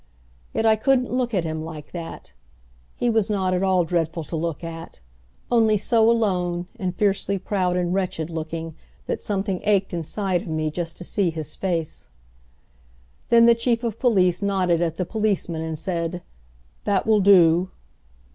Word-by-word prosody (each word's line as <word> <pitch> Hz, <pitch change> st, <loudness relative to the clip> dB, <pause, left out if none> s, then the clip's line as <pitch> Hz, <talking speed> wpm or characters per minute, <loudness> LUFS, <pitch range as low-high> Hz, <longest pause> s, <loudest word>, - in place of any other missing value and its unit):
Yet 225 Hz, -, -1 dB
I 220 Hz, -1 st, +5 dB
couldn't 250 Hz, +2 st, +1 dB
look 250 Hz, -2 st, 0 dB
at 190 Hz, -6 st, 0 dB
him 160 Hz, -1 st, -3 dB
like 155 Hz, -2 st, -9 dB
that. 170 Hz, -2 st, -8 dB, 0.6 s
He 245 Hz, -, -1 dB
was 220 Hz, -3 st, +2 dB
not 190 Hz, -3 st, 0 dB
at 180 Hz, -, 0 dB
all 190 Hz, -2 st, +3 dB
dreadful 165 Hz, 0 st, -1 dB
to 165 Hz, -, -6 dB
look 165 Hz, 0 st, -3 dB
at, 165 Hz, -, -8 dB, 0.5 s
only 220 Hz, -3 st, +4 dB
so 225 Hz, +2 st, +3 dB
alone 180 Hz, -6 st, +1 dB
and 185 Hz, -3 st, -2 dB
fiercely 200 Hz, -1 st, +1 dB
proud 185 Hz, -2 st, -1 dB
and 175 Hz, 0 st, 0 dB
wretched 185 Hz, -4 st, -2 dB
looking 160 Hz, 0 st, -5 dB, 0.3 s
that -, -, -3 dB
something 195 Hz, -2 st, -2 dB
ached 200 Hz, -2 st, +1 dB
inside 175 Hz, +2 st, -1 dB
of -, -, -10 dB
me 155 Hz, -1 st, -1 dB
just 165 Hz, 0 st, -4 dB
to -, -, -6 dB
see 190 Hz, 0 st, 0 dB
his 155 Hz, -2 st, -4 dB
face. 170 Hz, -5 st, -3 dB, 1.2 s
Then 230 Hz, 0 st, +6 dB
the 235 Hz, -, +7 dB
Chief 235 Hz, 0 st, 0 dB
of 230 Hz, -2 st, -3 dB
Police 190 Hz, -8 st, +3 dB
nodded 185 Hz, -4 st, +1 dB
at 165 Hz, -2 st, -1 dB
the 185 Hz, -, -1 dB
policeman 200 Hz, -6 st, -1 dB
and 160 Hz, -1 st, -4 dB
said, 175 Hz, 0 st, -3 dB, 0.6 s
"That 200 Hz, -2 st, +1 dB
will 220 Hz, -1 st, +4 dB
do." 185 Hz, -2 st, +5 dB
185 Hz, 165 wpm, -23 LUFS, 165-210 Hz, 1.2 s, the